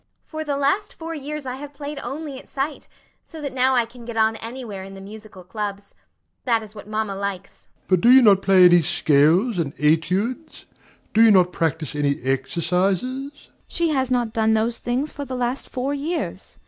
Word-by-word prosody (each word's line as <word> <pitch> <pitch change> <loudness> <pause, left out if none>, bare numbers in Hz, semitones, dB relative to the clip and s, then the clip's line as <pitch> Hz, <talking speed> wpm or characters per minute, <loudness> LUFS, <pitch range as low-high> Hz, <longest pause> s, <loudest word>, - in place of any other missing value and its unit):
FATIMA. - - -48
For 315 -1 -4
the 290 -2 -2
last 285 +9 0
four 330 0 -6
years 300 -1 -5
I 255 0 -4
have 285 +1 -9
played 290 +1 -6
only 285 -2 -6
at - - -16
sight, 280 +2 -4 0.4
so 325 - -11
that 280 -3 -5
now 260 0 +2
I 240 -2 +3
can 235 +1 -14
get 230 -1 -7
on 220 0 +3
anywhere 225 -4 -7
in 195 0 -10
the - - -10
musical 205 -1 -11
clubs. 200 +1 -6 0.5
That 230 -3 +1
is 210 -1 -12
what 205 -2 -11
mamma 215 -1 -2
likes. 195 -1 -6
DOMINIE. - - -41
But 185 -2 +3
do 235 - +5
you 260 0 +8
not 200 -3 +6
play 190 -2 +6
any 175 -1 +7
scales 160 - +3
and 150 -4 -2
études? 185 - 0 0.5
do 220 - +4
you 225 - +7
not 180 -3 +4
practise 160 -2 -2
any 145 -1 0
exercises? 170 - 0 0.3
AUNT. 295 - -22 0.2
She 335 -1 0
has 265 -4 0
not 240 -3 0
done 220 -1 +2
those 230 +2 0
things 255 +5 -2
for 285 - -6
the 260 -2 -5
last 250 +1 -2
four 265 +2 -2
years. 310 +5 -4
225 Hz, 205 wpm, -22 LUFS, 190-270 Hz, 0.5 s, you